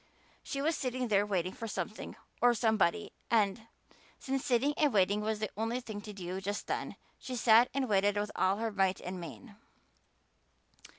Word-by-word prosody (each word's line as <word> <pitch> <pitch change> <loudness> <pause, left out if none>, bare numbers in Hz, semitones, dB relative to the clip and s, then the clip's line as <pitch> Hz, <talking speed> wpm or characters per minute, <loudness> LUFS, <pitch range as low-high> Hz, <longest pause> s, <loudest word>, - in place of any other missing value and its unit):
She 275 0 -4
was 320 +2 +2
sitting 255 -1 -2
there 205 0 +3
waiting 185 -2 -1
for 230 - -6
something 215 0 -5 0.3
or 240 0 +5
somebody 215 -3 +1 0.2
and, 220 0 +1 0.5
since 270 0 -2
sitting 260 +4 +2
and 300 -2 +3
waiting 205 0 +3
was 215 0 -1
the 215 -1 -3
only 225 +4 -1
thing 220 -4 -7
to 210 - -8
do 190 -1 -5
just 205 +2 -3
then, - - -3 0.2
she 255 - -5
sat 235 +1 +6
and 270 -1 -1
waited 205 -1 +2
with 205 0 -1
all 190 +1 +2
her 225 0 -2
might 195 -2 +1
and 180 0 -6
main. 205 +5 -10
215 Hz, 175 wpm, -32 LUFS, 200-240 Hz, 0.5 s, sat